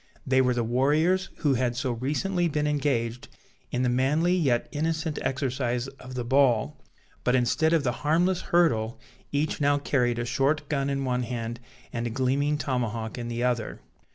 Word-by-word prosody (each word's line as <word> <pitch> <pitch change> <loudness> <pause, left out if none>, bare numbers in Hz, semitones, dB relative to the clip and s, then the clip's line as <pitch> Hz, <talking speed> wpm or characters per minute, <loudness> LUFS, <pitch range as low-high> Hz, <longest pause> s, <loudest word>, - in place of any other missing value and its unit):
They 130 0 +3
were 125 -1 +2
the 120 - 0
warriors 150 +10 +2
who 145 -3 +3
had 125 -1 0
so 130 +1 -1
recently 160 +9 0
been 150 -2 -1
engaged 130 -5 -1 0.4
in 125 +1 -1
the - - +2
manly 150 +8 +2
yet 135 -9 +1
innocent 160 +1 -1
exercise 130 -2 -1
of 130 0 -9
the 125 - -2
ball; 120 - +2 0.4
but, 125 - +2
instead 130 +6 +2
of 165 -3 +3
the 125 - +1
harmless 175 +5 +2
hurdle, 115 -10 +2 0.3
each 150 +1 -1
now 145 0 +3
carried 125 -4 +1
a 120 - -2
short 135 +4 0
gun 140 -2 0
in 140 -1 -1
one 125 -1 0
hand 120 -1 -4 0.3
and 115 0 -2
a - - -2
gleaming 135 +4 +1
tomahawk 120 -4 -2
in 120 - -4
the 120 0 -2
other. 120 -2 -1
130 Hz, 175 wpm, -27 LUFS, 120-150 Hz, 0.4 s, They